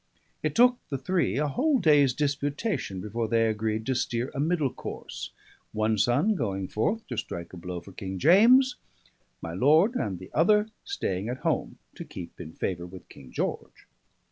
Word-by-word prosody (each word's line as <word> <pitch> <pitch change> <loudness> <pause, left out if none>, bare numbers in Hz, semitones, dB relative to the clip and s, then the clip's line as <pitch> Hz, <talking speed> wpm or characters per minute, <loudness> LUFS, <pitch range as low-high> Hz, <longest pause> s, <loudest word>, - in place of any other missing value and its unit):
It - - -2
took 245 +1 +5
the 140 - -2
three 180 +3 0
a 150 +1 +1
whole 275 - +2
day's 150 - +5
disputation 145 - -2
before 110 +3 -3
they 115 0 +2
agreed 110 0 -1
to 130 - +1
steer 120 0 -1
a 140 - -4
middle 155 -3 +1
course, - - -7 0.4
one 110 0 +1
son 140 - +3
going 95 - -2
forth 220 - -1
to - - -4
strike 85 +1 -5
a - - -8
blow 90 0 -6
for 100 - -13
King 95 0 -6
James, 235 - +6 0.7
my 80 - -5
lord 155 - +4
and 105 - -2
the 95 +1 -12
other 210 +7 +4
staying 105 - -3
at 125 - -5
home - - 0 0.2
to - - -8
keep 90 0 -9
in 80 -2 -8
favour 90 -1 -3
with 90 0 -12
King 65 - -14
George. - - -4
125 Hz, 175 wpm, -27 LUFS, -, 0.7 s, James